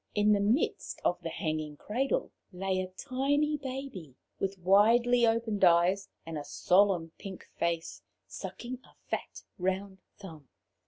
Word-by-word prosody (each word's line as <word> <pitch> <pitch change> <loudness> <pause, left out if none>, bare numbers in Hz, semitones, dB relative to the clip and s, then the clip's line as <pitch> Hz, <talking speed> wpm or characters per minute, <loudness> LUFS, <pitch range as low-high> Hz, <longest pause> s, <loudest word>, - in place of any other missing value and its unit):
In 210 0 +4
the 205 - +4
midst 215 +8 0
of - - +1
the - - -4
hanging 155 -3 -3
cradle 270 - -1 0.2
lay 190 0 -1
a 185 - -3
tiny 280 +9 0
baby, 260 - -6 0.2
with 195 0 -2
widely 230 +6 +5
opened 225 -3 0
eyes 180 +3 +4 0.2
and 160 -2 -4
a - - -6
solemn 180 +3 +2
pink 190 -2 -8
face, 170 -1 -1 0.2
sucking 245 +1 -7
a - - -21 0.2
fat - - -4 0.2
round 190 +1 -2 0.2
thumb. 160 - -11
195 Hz, 140 wpm, -30 LUFS, 175-240 Hz, 0.2 s, widely